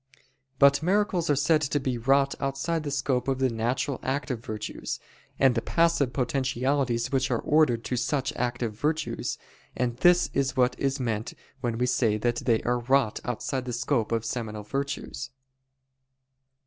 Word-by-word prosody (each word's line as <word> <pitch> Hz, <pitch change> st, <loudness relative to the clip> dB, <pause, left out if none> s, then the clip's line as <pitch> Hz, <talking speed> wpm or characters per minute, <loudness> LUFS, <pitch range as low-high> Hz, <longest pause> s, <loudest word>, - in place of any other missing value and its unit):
But 140 Hz, +1 st, +5 dB
miracles 185 Hz, -1 st, +1 dB
are 145 Hz, -, +4 dB
said 150 Hz, +3 st, +3 dB
to 145 Hz, 0 st, 0 dB
be 130 Hz, -2 st, -1 dB
wrought 135 Hz, +3 st, +3 dB
outside 135 Hz, +5 st, -1 dB
the 150 Hz, -, -4 dB
scope 130 Hz, -2 st, 0 dB
of 135 Hz, -1 st, +1 dB
the 130 Hz, -1 st, +1 dB
natural 120 Hz, +4 st, -1 dB
active 130 Hz, -3 st, -2 dB
virtues, 110 Hz, -5 st, -5 dB, 0.4 s
and 135 Hz, -2 st, +4 dB
the 115 Hz, -, 0 dB
passive 165 Hz, -5 st, +2 dB
potentialities 130 Hz, -1 st, 0 dB
which 130 Hz, -1 st, +1 dB
are 125 Hz, -, +1 dB
ordered 145 Hz, -7 st, +3 dB
to 125 Hz, -, -2 dB
such 130 Hz, +3 st, -1 dB
active 120 Hz, -2 st, -2 dB
virtues, 150 Hz, +7 st, -2 dB, 0.4 s
and 120 Hz, -1 st, -1 dB
this 175 Hz, +5 st, +4 dB
is 135 Hz, -1 st, 0 dB
what 125 Hz, 0 st, +3 dB
is 135 Hz, 0 st, 0 dB
meant 115 Hz, -3 st, -2 dB, 0.2 s
when 120 Hz, -3 st, -2 dB
we 125 Hz, -, +1 dB
say 120 Hz, -4 st, +2 dB
that 120 Hz, +2 st, 0 dB
they 115 Hz, -2 st, +1 dB
are 120 Hz, 0 st, +1 dB
wrought 120 Hz, -2 st, +2 dB
outside 125 Hz, +2 st, -3 dB
the 125 Hz, -, -4 dB
scope 120 Hz, -2 st, 0 dB
of 115 Hz, -1 st, 0 dB
seminal 110 Hz, -2 st, -4 dB
virtues. 140 Hz, +2 st, -4 dB
130 Hz, 160 wpm, -27 LUFS, 120-140 Hz, 0.4 s, But